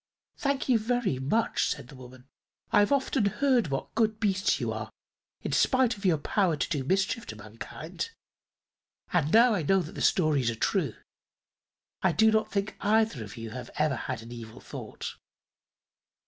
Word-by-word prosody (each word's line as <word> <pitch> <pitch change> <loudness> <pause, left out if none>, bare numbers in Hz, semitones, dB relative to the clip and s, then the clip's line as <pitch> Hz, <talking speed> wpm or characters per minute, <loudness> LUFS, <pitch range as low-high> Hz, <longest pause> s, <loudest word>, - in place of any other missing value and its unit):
"Thank 280 -1 -1
you 245 -4 +4
very 220 - 0
much," 150 +13 +1
said 125 - -4
the 140 - -11
woman. 130 0 -13 0.5
"I've 205 +1 +4
often 270 -4 +2
heard 245 +2 +2
what 135 -1 -4
good 220 -1 +1
beasts 200 -1 +1
you - - -1
are, - - -5 0.5
in - - -3
spite 255 -3 +3
of 200 0 -10
your 175 -4 +4
power 185 - +1
to - - -1
do 145 -5 -1
mischief 195 - 0
to 110 - -6
mankind, 115 - -7 1.0
and 160 -4 +2
now 235 +1 +6
I 190 - 0
know 190 +6 +3
that 155 - -9
the - - -6
stories 150 -8 +3
are 115 - -2
true. - - 0 1.1
I 190 -3 +3
do 220 +3 +5
not 220 0 +1
think 200 0 -2
either 215 - +2
of 105 +3 -10
you 115 -1 -6
have 125 0 -7
ever 150 -2 +1
had 115 -1 -4
an 115 - -11
evil 115 -2 -9
thought." - - -7
190 Hz, 175 wpm, -28 LUFS, 130-220 Hz, 1.1 s, now